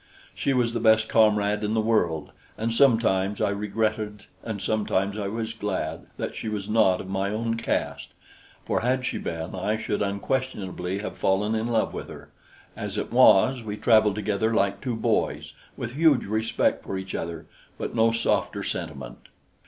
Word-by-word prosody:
She - - -1
was 120 -3 +1
the 120 - -1
best 110 -1 +4
comrade 105 -1 +3
in 105 +1 0
the - - +2
world, 90 -9 +1 0.3
and 115 +1 -1
sometimes 110 -6 +3
I - - +1
regretted 105 +1 -2 0.2
and 110 -3 -4
sometimes 100 -1 0
I 105 -2 -3
was 110 +2 -3
glad 105 -3 -3
that - - -4
she 110 - -4
was 105 -2 -4
not 105 -4 +3
of - - -9
my 95 +1 -1
own 115 +2 -1
caste, 115 - -3 0.5
for - - 0
had 125 +1 0
she - - -2
been, 80 0 -5
I 105 +4 -1
should 105 -2 -2
unquestionably 100 -3 -2
have 105 - -6
fallen 100 +3 +1
in 110 +1 -1
love 115 -2 0
with - - -6
her. - - -11 0.5
As - - -5
it - - -3
was, 125 +6 +6
we 105 -2 -5
traveled 110 -3 +4
together 105 +1 0
like 100 -1 +1
two 125 -3 -2
boys, 110 - -1 0.2
with 120 0 -5
huge 155 -2 +4
respect 110 +2 0
for 95 - -4
each 95 0 -6
other 80 -1 -4 0.3
but - - -4
no 115 0 +4
softer 115 0 0
sentiment. - - -5
110 Hz, 175 wpm, -25 LUFS, 100-115 Hz, 0.5 s, was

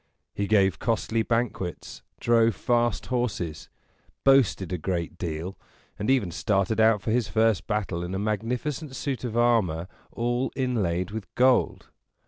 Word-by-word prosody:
He 100 - -2
gave 95 -6 +3
costly 115 0 0
banquets, 115 -6 -2 0.2
drove 115 -2 +3
fast 120 -1 +1
horses, 105 - -3 0.5
boasted 130 -9 +3
a 90 - -2
great 85 0 -3
deal, 85 +3 -4 0.4
and 105 - -2
even 125 -10 +2
started 100 +2 0
out 110 -2 +4
for 110 - -1
his 120 -2 +1
first 110 -2 +1
battle 100 -5 -2
in 90 +2 -4
a - - -1
magnificent 125 +8 -2
suit 135 -3 -3
of 120 -2 -3
armor 105 -9 +2 0.2
all 120 +2 -1
inlaid 105 -9 -1
with 110 -2 -5
gold. 125 0 +2
110 Hz, 140 wpm, -26 LUFS, 95-120 Hz, 0.5 s, out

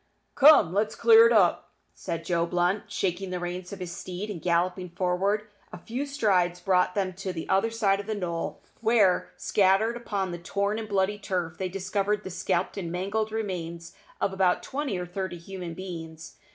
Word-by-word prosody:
"Come, 275 - +7
let's 210 +2 0
clear 460 0 +7
it - - +1
up," - - +3 0.3
cried 165 0 -4
Joe 170 -1 +1
Blunt, 180 +3 0
shaking 190 0 -2
the 180 0 -3
reins 175 +1 -5
of 200 - -6
his 180 -2 -6
steed, 185 +4 -5
and 170 -6 -7
galloping 180 +2 0
forward. 190 +4 0 0.3
A - - -7
few 260 +5 -4
strides 190 -10 +1
brought 180 0 +2
them 190 -2 0
to 190 +1 -5
the 165 -3 -6
other 195 +4 +2
side 205 -4 +1
of 200 - -7
the 220 - -1
knoll, 170 -4 -4 0.2
where, 220 -5 +3
scattered 205 +4 +2
upon 200 -6 -3
the 175 - -5
torn 200 +5 -1
and 220 -1 -6
bloody 200 +1 +1
turf, 175 -5 -3
they 190 -1 -2
discovered 195 +2 -1
the 190 - -6
scalped 175 +2 -1
and 175 -4 -4
mangled 200 +5 -2
remains 170 -6 -4 0.3
of 195 - 0
about 190 -2 +2
twenty 270 -7 -3
or 180 - -3
thirty 180 0 -4
human 175 -1 -7
beings. 165 -3 -8
190 Hz, 185 wpm, -27 LUFS, 175-205 Hz, 0.3 s, Come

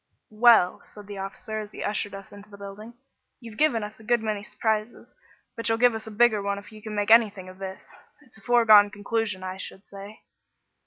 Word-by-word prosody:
"Well," 220 -5 +5
said 210 -1 -14
the 200 -1 -8
officer 205 +3 -6
as 210 -1 -8
he - - -6
ushered 205 -1 -2
us 195 0 -11
into 205 +1 -14
the 200 - -13
building, 200 +4 -10 0.4
"you've 230 -3 -11
given 280 -8 +2
us 210 +1 -8
a - - -14
good 240 +2 +2
many 215 -2 -2
surprises, 215 +1 -3 0.4
but 230 -1 -2
you'll 225 - +2
give 245 0 +4
us 220 0 -6
a - - -7
bigger 220 -1 +3
one 200 0 -2
if 200 +2 -11
you 215 0 -13
can 215 0 -7
make 205 +1 0
anything 210 -5 +4
of 185 +1 -13
this. 190 -1 -8 0.4
It's 260 - -16
a - - -22
foregone 220 -4 +6
conclusion, 205 -1 -3
I 185 0 -5
should 190 +1 -10
say." 200 +2 -11
210 Hz, 215 wpm, -25 LUFS, 200-225 Hz, 0.4 s, foregone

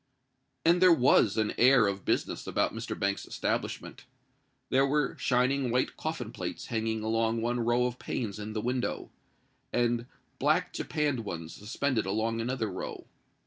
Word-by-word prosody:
And 175 +2 +5
there 185 -1 +8
was 125 -8 +4
an 110 -1 +1
air 125 -2 +6
of 100 -2 -2
business - - -1
about - - +1
Mr. - - -5
Banks's 100 0 -1
establishment. - - -3 0.7
There 135 +1 +4
were 150 +1 +1
shining 130 +1 +2
white 125 +2 0
coffin - - -4
plates - - -5
hanging 110 -1 -1
along 115 +1 +1
one 120 +1 0
row 120 +1 +2
of 125 0 -3
panes 105 -4 -3
in 105 +1 -5
the 110 - -2
window; 125 +1 -2 0.6
and 120 0 +1 0.3
black - - +2
japanned 150 -4 -1
ones 85 -5 -6
suspended 115 +1 -1
along 115 +3 0
another 125 0 -1
row. 95 -2 -6
120 Hz, 150 wpm, -29 LUFS, 110-130 Hz, 0.7 s, there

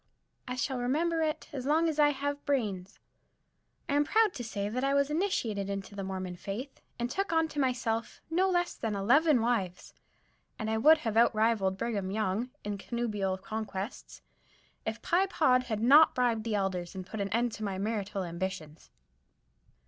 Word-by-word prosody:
I 250 - -3
shall 255 0 -2
remember 325 +7 +1
it 310 -1 -1
as 265 -2 -4
long 320 +3 +3
as 310 -2 -2
I 295 -1 +6
have 285 0 -3
bra'in's. 210 -9 -2 0.9
I - - -1
am 290 +1 +4
proud 435 +5 +3
to 245 - -6
say 205 -3 -3
that 250 +5 -2
I 275 0 +2
was 280 +1 +2
initiated 230 - -1
into 195 0 -5
the 200 -1 -5
Mormon 185 -2 -4
faith 225 +10 -6 0.2
and 240 - -1
took 390 +9 -2
unto 325 -2 +1
myself 240 -4 -1
no 365 +4 +2
less 350 -1 +1
than 220 -2 -3
eleven 260 +7 +4
wives; 215 -7 -1 0.6
and 220 -1 -3
I 220 - +1
would 310 +7 +7
have 225 -7 -2
outrivaled 215 -4 +3
Brigham 205 -5 -2
Young 215 +3 -1
in 205 -1 -4
connubial 210 -4 -2
conquests 205 +1 -6 0.6
if 220 +1 -4
Pye 370 +3 +2
Pod 255 -9 +3
had 220 -3 -2
not 290 +7 +7
bribed 235 -3 +1
the 225 -2 0
Elders 190 -3 -2
and 185 -1 -5
put 215 +2 -5
an 200 - -2
end 235 +3 +1
to 220 - -7
my 195 -2 -2
marital 205 -1 -2
ambitions. 170 -3 -5
230 Hz, 175 wpm, -30 LUFS, 200-285 Hz, 0.9 s, would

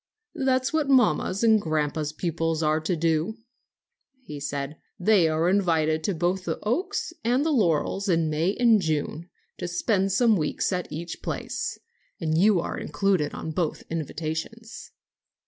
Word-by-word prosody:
"That 260 -1 +1
is 260 - -2
what 310 -3 +1
mamma's 210 - +3
and 220 -2 +5
grandpa's 155 -2 -1
pupils 165 0 -1
are 155 +1 +2
to 160 +3 -1
do," 165 +6 0 0.9
he 150 - -8
said. 140 +1 -4 0.2
"They 185 -2 +4
are 160 +2 +1
invited 160 -5 +2
to 200 - 0
both 180 +3 0
the 165 - -2
Oaks 370 - -1
and 250 +5 +2
the 320 - +2
Laurels 195 - +1
in 165 -2 +2
May 160 +6 0
and 230 -4 +4
June, 160 +1 -2 0.3
to - - -3
spend 195 +2 0
some 225 +2 +4
weeks 155 +2 -1
at 180 -1 -3
each 170 +3 -6
place. - - -4 0.4
And 160 -2 0
you 195 +2 +4
are - - -3
included 160 0 0
in 160 - -5
both 160 0 -2
invitations." 165 - -5
175 Hz, 155 wpm, -26 LUFS, 155-215 Hz, 0.9 s, and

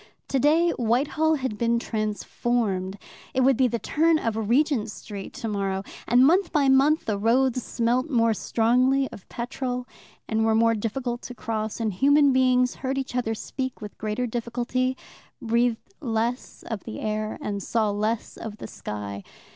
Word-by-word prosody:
Today 305 +6 +3
Whitehall 285 +7 +2
had 260 -7 -3
been 235 0 +2
transformed: 215 -3 -1 0.4
it 260 - +3
would 265 +1 +5
be 255 +1 +3
the 235 0 -1
turn 320 +7 +2
of 230 -7 -1
Regent 255 -3 +2
Street 205 -2 -8
tomorrow. 195 -3 -2 0.2
And 245 +3 +6
month 355 +5 +3
by 285 -4 +3
month 280 +4 +4
the 205 -2 -1
roads 255 +3 +2
smelt 240 +5 0
more 230 -4 +3
strongly 255 +5 +2
of 195 - -12
petrol, 250 +1 -4 0.4
and 220 0 +1
were 220 0 +3
more 230 0 +4
difficult 240 +3 -3
to 250 - -8
cross, 220 -1 -3
and 220 -3 -1
human 280 +6 +4
beings 255 -1 +3
heard 265 0 -1
each 265 -2 -3
other 225 -3 0
speak 260 +3 -5
with 210 -2 -8
greater 215 +3 -1
difficulty, 245 +2 -1 0.4
breathed 235 +8 0
less 235 -2 -2
of 220 -4 -5
the 225 - -6
air, 215 0 -2
and 200 -1 -3
saw 215 +1 0
less 215 +2 -2
of 220 -2 -7
the - - -8
sky. 100 -1 -6
235 Hz, 160 wpm, -25 LUFS, 220-260 Hz, 0.4 s, And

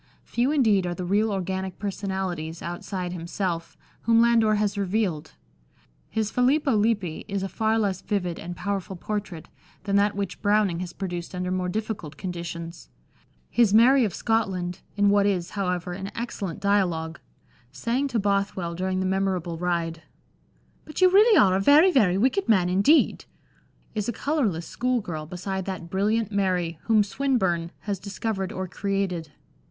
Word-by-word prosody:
Few 245 +3 0
indeed 215 -11 +3
are 175 - -3
the 180 - -4
real 210 +4 +2
organic 190 -1 -3
personalities, 190 -5 -4
outside 175 +1 -4
himself, 170 0 -4 0.2
whom 230 0 +4
Landor 230 -2 +4
has 205 -1 0
revealed; 195 - -1 0.8
his 220 0 -1
Filippo 270 +1 +2
Lippi 205 -6 0
is 195 -1 -2
a - - -1
far 220 +2 0
less 195 -4 0
vivid 180 -4 -2
and 175 +1 -6
powerful 195 -1 -3
portrait 195 -3 -5 0.4
than 200 -1 +1
that 205 0 +2
which 200 -2 -4
Browning 205 -4 +2
has 180 -1 -5
produced 175 -1 -5
under 180 0 -2
more 185 -1 -1
difficult 195 -7 -4
conditions; 170 -2 -6 0.6
his 225 -4 +4
Mary 255 +4 +6
of 205 -7 -1
Scotland 190 -6 -1 0.2
(in 205 0 +4
what 200 0 +4
is, 185 -3 -1
however, 180 -3 -2
an 195 +2 -5
excellent 205 -6 -4
dialogue), 175 -5 0 0.5
saying 240 - -1
to 245 - -2
Bothwell 200 -4 0
during 185 +2 -1
the - - -1
memorable 185 -3 -1
ride, 170 -2 -1 0.4
" - - -37
But 310 - -7
you 370 -1 +6
really 425 +3 +6
are 185 -2 +5
a - - +2
very, 300 - +6
very 200 - +3
wicked 260 - +1
man 185 -5 +4
indeed," 200 - +3 0.7
is 210 0 -2
a - - +1
colourless 235 - -1
school 250 0 0
girl 155 -7 -6
beside 190 +2 -4
that 180 -3 -6
brilliant 215 +3 +1
Mary 180 -5 0
whom 220 -2 +4
Swinburne 195 -7 0
has 200 -3 -3
discovered 195 -1 -3
or 185 0 -4
created. 185 -5 -2
195 Hz, 160 wpm, -25 LUFS, 180-215 Hz, 0.8 s, Mary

